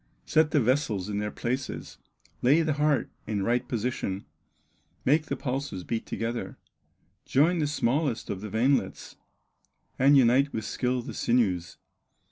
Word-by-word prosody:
Set 155 Hz, 0 st, +3 dB
the 155 Hz, -, +3 dB
vessels 115 Hz, -6 st, 0 dB
in 105 Hz, 0 st, -2 dB
their 105 Hz, 0 st, -2 dB
places, 125 Hz, +5 st, -4 dB, 0.4 s
Lay 145 Hz, +7 st, +4 dB
the 155 Hz, -1 st, +1 dB
heart 150 Hz, -1 st, +1 dB, 0.2 s
in 105 Hz, -2 st, -1 dB
right 120 Hz, +4 st, 0 dB
position, 110 Hz, -5 st, -2 dB, 0.8 s
Make 150 Hz, +4 st, +3 dB
the -, -, -2 dB
pulses 130 Hz, -8 st, -4 dB
beat 115 Hz, +3 st, -3 dB
together, 115 Hz, +1 st, -4 dB, 0.7 s
Join 165 Hz, +6 st, +3 dB
the 150 Hz, -, +1 dB
smallest 140 Hz, -2 st, 0 dB
of 95 Hz, -, -5 dB
the 105 Hz, -, -6 dB
veinlets, 125 Hz, +6 st, 0 dB, 0.8 s
And 140 Hz, +2 st, +6 dB
unite 135 Hz, +3 st, +4 dB
with 110 Hz, -1 st, -3 dB
skill 125 Hz, +1 st, -1 dB
the -, -, -7 dB
sinews. 95 Hz, -8 st, 0 dB
125 Hz, 140 wpm, -27 LUFS, 110-145 Hz, 0.8 s, And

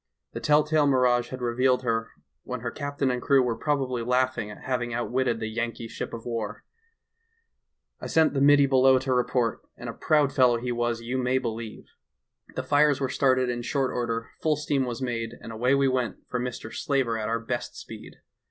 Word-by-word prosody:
The -, -, -4 dB
tell 150 Hz, 0 st, +4 dB
tale 155 Hz, -1 st, +2 dB
mirage 125 Hz, -3 st, +3 dB
had 130 Hz, -1 st, -6 dB
revealed 125 Hz, +2 st, +2 dB
her 115 Hz, -2 st, -1 dB, 0.3 s
when 125 Hz, -, -6 dB
her 120 Hz, -1 st, -3 dB
captain 145 Hz, -1 st, -2 dB
and 125 Hz, 0 st, -2 dB
crew 135 Hz, 0 st, +4 dB
were 120 Hz, -2 st, 0 dB
probably 130 Hz, -3 st, -1 dB
laughing 125 Hz, -2 st, 0 dB
at 105 Hz, -, -11 dB
hav 130 Hz, -2 st, -1 dB
ing 120 Hz, -1 st, -3 dB
outwitted 120 Hz, 0 st, 0 dB
the 110 Hz, -, -3 dB
Yankee 115 Hz, +1 st, -3 dB
ship -, -, -6 dB
of 115 Hz, -1 st, -8 dB
war. 115 Hz, -3 st, -4 dB, 1.4 s
"I -, -, -6 dB
sent 160 Hz, -2 st, +3 dB
the 135 Hz, -, 0 dB
middy 145 Hz, 0 st, +6 dB
below 130 Hz, -1 st, +5 dB
to 130 Hz, 0 st, -1 dB
report, 125 Hz, -2 st, +1 dB, 0.2 s
and -, -, -8 dB
a -, -, -4 dB
proud 150 Hz, -3 st, +2 dB
fellow 125 Hz, -3 st, +4 dB
he 125 Hz, +1 st, -3 dB
was, 120 Hz, -1 st, -1 dB
you 125 Hz, +3 st, -2 dB
may 125 Hz, +1 st, +1 dB
believe. 115 Hz, -3 st, -5 dB, 0.6 s
The -, -, -2 dB
fires 145 Hz, -1 st, +3 dB
were 135 Hz, -2 st, -1 dB
started 130 Hz, -1 st, +2 dB
in 120 Hz, -1 st, -2 dB
short 135 Hz, +2 st, -1 dB
order, 115 Hz, -1 st, -2 dB
full 155 Hz, -1 st, +2 dB
steam 145 Hz, -2 st, 0 dB
was 120 Hz, +1 st, -4 dB
made, 115 Hz, -2 st, -3 dB
and 115 Hz, -, -9 dB
away 125 Hz, +4 st, +2 dB
we 140 Hz, 0 st, +3 dB
went 130 Hz, -2 st, -2 dB
for 125 Hz, -, -2 dB
Mr. 120 Hz, -2 st, -5 dB
Slaver 135 Hz, -5 st, 0 dB
at 110 Hz, -, -2 dB
our 115 Hz, -, +1 dB
best 120 Hz, +1 st, -4 dB
speed. -, -, -10 dB
125 Hz, 200 wpm, -26 LUFS, 115-135 Hz, 1.4 s, middy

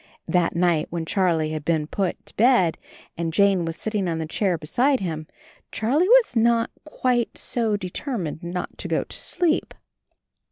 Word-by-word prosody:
That 175 Hz, -3 st, +1 dB
night 170 Hz, -3 st, +2 dB
when 165 Hz, -1 st, -3 dB
Charlie 165 Hz, -4 st, +1 dB
had 155 Hz, -1 st, -4 dB
been 160 Hz, -1 st, +1 dB
put 185 Hz, +3 st, -3 dB
to -, -, -12 dB
bed 225 Hz, -8 st, +4 dB, 0.4 s
and 165 Hz, -1 st, -2 dB
Jane 195 Hz, -1 st, +3 dB
was 165 Hz, 0 st, -3 dB
sitting 210 Hz, -3 st, -2 dB
on 165 Hz, -, -1 dB
the 160 Hz, -, -2 dB
chair 180 Hz, +2 st, 0 dB
be 155 Hz, -, -10 dB
side 260 Hz, -, +2 dB
him, 160 Hz, -4 st, -4 dB, 0.4 s
Charlie 290 Hz, -, +1 dB
was -, -, +5 dB
not 230 Hz, 0 st, +3 dB
quite 250 Hz, -5 st, 0 dB
so 225 Hz, -4 st, 0 dB
deter 185 Hz, -3 st, -5 dB
88 -, -, -28 dB, 0.2 s
CHARLIE 200 Hz, -, -2 dB
mined 155 Hz, -1 st, -5 dB
not 175 Hz, +1 st, -4 dB
to -, -, -4 dB
go -, -, 0 dB
to -, -, -9 dB
sleep. 335 Hz, -3 st, -1 dB
185 Hz, 190 wpm, -24 LUFS, 165-230 Hz, 0.4 s, was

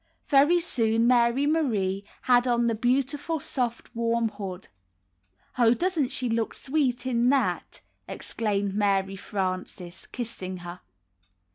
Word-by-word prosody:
Very 295 Hz, +5 st, +5 dB
soon 230 Hz, -9 st, +1 dB
Mary 240 Hz, +2 st, +3 dB
Marie 215 Hz, -11 st, 0 dB, 0.2 s
had 245 Hz, 0 st, +4 dB
on 240 Hz, -1 st, +2 dB
the 230 Hz, -, +2 dB
beautiful 275 Hz, +7 st, 0 dB
soft 245 Hz, -5 st, -3 dB
warm 230 Hz, 0 st, +1 dB
hood. 195 Hz, -3 st, -7 dB, 0.9 s
''Oh, 235 Hz, 0 st, +5 dB
doesn't 340 Hz, -7 st, 0 dB
she 250 Hz, -, 0 dB
look 225 Hz, -1 st, -1 dB
sweet 265 Hz, -3 st, -1 dB
in 245 Hz, -1 st, +2 dB
that?" 275 Hz, 0 st, 0 dB, 0.3 s
exclaimed 205 Hz, -3 st, -2 dB
Mary 195 Hz, -1 st, +1 dB
Frances, 185 Hz, -2 st, -5 dB
kissing 190 Hz, -7 st, -6 dB
her. 175 Hz, +1 st, -8 dB
235 Hz, 120 wpm, -26 LUFS, 200-260 Hz, 0.9 s, Very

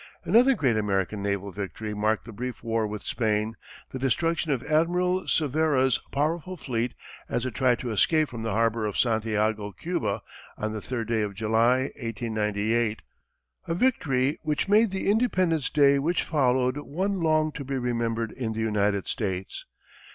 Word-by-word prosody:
Another 250 Hz, +4 st, +5 dB
great 130 Hz, -, +2 dB
American 100 Hz, -1 st, 0 dB
naval 100 Hz, 0 st, -2 dB
victory 105 Hz, +2 st, -5 dB
marked 110 Hz, +1 st, 0 dB
the 115 Hz, -, -9 dB
brief 125 Hz, +2 st, -6 dB
war 115 Hz, -2 st, 0 dB
with 105 Hz, -1 st, -6 dB
Spain 110 Hz, -1 st, 0 dB, 0.4 s
the 130 Hz, -, -5 dB
destruction 165 Hz, +5 st, 0 dB
of 130 Hz, -3 st, -1 dB
Admiral 180 Hz, +4 st, +1 dB
Cervera's 145 Hz, -4 st, +2 dB
powerful 165 Hz, +5 st, -1 dB
fleet 120 Hz, -4 st, -2 dB, 0.3 s
as 120 Hz, -, -1 dB
it 130 Hz, -, -3 dB
tried 125 Hz, -1 st, +2 dB
to 120 Hz, -, -4 dB
escape 155 Hz, -, +3 dB
from 120 Hz, -4 st, -7 dB
the 115 Hz, -, -2 dB
harbor 115 Hz, +1 st, +1 dB
of 105 Hz, -, -4 dB
Santiago, 110 Hz, -2 st, +1 dB
Cuba, 175 Hz, -, -3 dB, 0.3 s
on 110 Hz, 0 st, -3 dB
the 110 Hz, -, -4 dB
third 115 Hz, -2 st, -4 dB
day 115 Hz, -1 st, +1 dB
of 100 Hz, -2 st, -3 dB
July, 115 Hz, +5 st, +2 dB
1898 110 Hz, 0 st, -1 dB, 0.6 s
a 165 Hz, -, -1 dB
victory 145 Hz, -, +1 dB
which 150 Hz, 0 st, -1 dB
made 215 Hz, +2 st, +5 dB
the 190 Hz, 0 st, -3 dB
Independence 185 Hz, -, +2 dB
Day 140 Hz, -2 st, +4 dB
which 165 Hz, +5 st, 0 dB
followed 130 Hz, -3 st, +1 dB
one 185 Hz, +7 st, -2 dB
long 155 Hz, -1 st, +2 dB
to 145 Hz, -, -6 dB
be 135 Hz, 0 st, -3 dB
remembered 115 Hz, -2 st, -1 dB
in 115 Hz, -4 st, -3 dB
the 110 Hz, -, -5 dB
United 105 Hz, -3 st, 0 dB
States. 95 Hz, -6 st, -3 dB
120 Hz, 160 wpm, -26 LUFS, 110-155 Hz, 0.6 s, Another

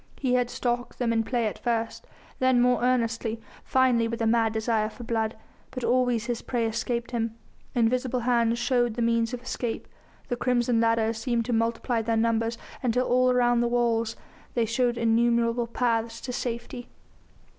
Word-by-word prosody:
He 255 Hz, -3 st, 0 dB
had 245 Hz, -1 st, +2 dB
stalked 245 Hz, -1 st, -2 dB
them 235 Hz, -2 st, 0 dB
in 225 Hz, 0 st, +2 dB
play 240 Hz, 0 st, -1 dB
at 215 Hz, -, -3 dB
first, 230 Hz, -2 st, -2 dB, 0.3 s
then 255 Hz, -1 st, +3 dB
more 245 Hz, 0 st, +3 dB
earnestly, 230 Hz, -2 st, 0 dB, 0.2 s
finally 250 Hz, -3 st, +3 dB
with 230 Hz, 0 st, -4 dB
a 225 Hz, -, 0 dB
mad 225 Hz, 0 st, +3 dB
desire 220 Hz, -1 st, 0 dB
for 240 Hz, -, -11 dB
blood. 225 Hz, -1 st, -1 dB, 0.3 s
But 255 Hz, -2 st, -6 dB
always 245 Hz, -2 st, +2 dB
his 240 Hz, -2 st, -3 dB
prey 240 Hz, -2 st, -1 dB
escaped 235 Hz, +1 st, -2 dB
him, 230 Hz, -2 st, -2 dB, 0.4 s
invisible 250 Hz, +1 st, +1 dB
hands 235 Hz, -1 st, +2 dB
showed 240 Hz, -2 st, +1 dB
the 235 Hz, -, -1 dB
means 230 Hz, 0 st, +1 dB
of 250 Hz, -1 st, -6 dB
escape; 245 Hz, -2 st, -4 dB, 0.4 s
the 245 Hz, -, -1 dB
crimson 240 Hz, -1 st, +1 dB
ladders 230 Hz, -1 st, +1 dB
seemed 235 Hz, -2 st, 0 dB
to 245 Hz, -, -1 dB
multiply 230 Hz, +1 st, 0 dB
their 225 Hz, 0 st, 0 dB
numbers 230 Hz, 0 st, +1 dB, 0.2 s
until 250 Hz, 0 st, +1 dB
all 255 Hz, +1 st, +3 dB
round 245 Hz, -1 st, +3 dB
the 240 Hz, -, +2 dB
walls 230 Hz, -2 st, +1 dB, 0.4 s
they 235 Hz, -2 st, +2 dB
showed 240 Hz, +1 st, 0 dB
innumerable 235 Hz, +1 st, +2 dB
paths 230 Hz, -1 st, -1 dB
to 250 Hz, -, -5 dB
safety. 240 Hz, 0 st, -5 dB
235 Hz, 170 wpm, -26 LUFS, 230-245 Hz, 0.4 s, then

